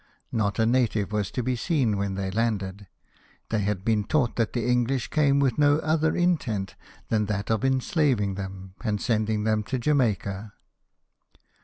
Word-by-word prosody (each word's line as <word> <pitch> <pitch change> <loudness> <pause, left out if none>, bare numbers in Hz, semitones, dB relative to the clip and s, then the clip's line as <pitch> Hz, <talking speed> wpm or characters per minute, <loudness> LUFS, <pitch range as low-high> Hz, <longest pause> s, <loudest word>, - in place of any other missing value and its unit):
Not 100 -4 0
a 110 - +3
native 115 -4 +1
was 105 -3 -1
to 125 - -3
be 125 +1 0
seen 125 - +1
when 100 -1 -2
they 95 -1 -3
landed, 100 -3 -2 0.6
they 110 - +1
had 100 -1 -2
been 110 -2 +2
taught 125 +1 +1
that 115 -3 0
the 120 -3 -1
English 125 +1 +1
came 140 -2 +3
with 135 -2 +1
no 145 0 +5
other 160 0 +1
intent 120 - 0 0.4
than 105 -2 +1
that 100 0 -2
of 110 -2 0
enslaving 130 - +1
them, 95 -1 -7
and 105 -3 0
sending 110 -2 0
them 110 0 +1
to 130 - -2
Jamaica. 110 -7 0
110 Hz, 165 wpm, -26 LUFS, 100-130 Hz, 0.6 s, no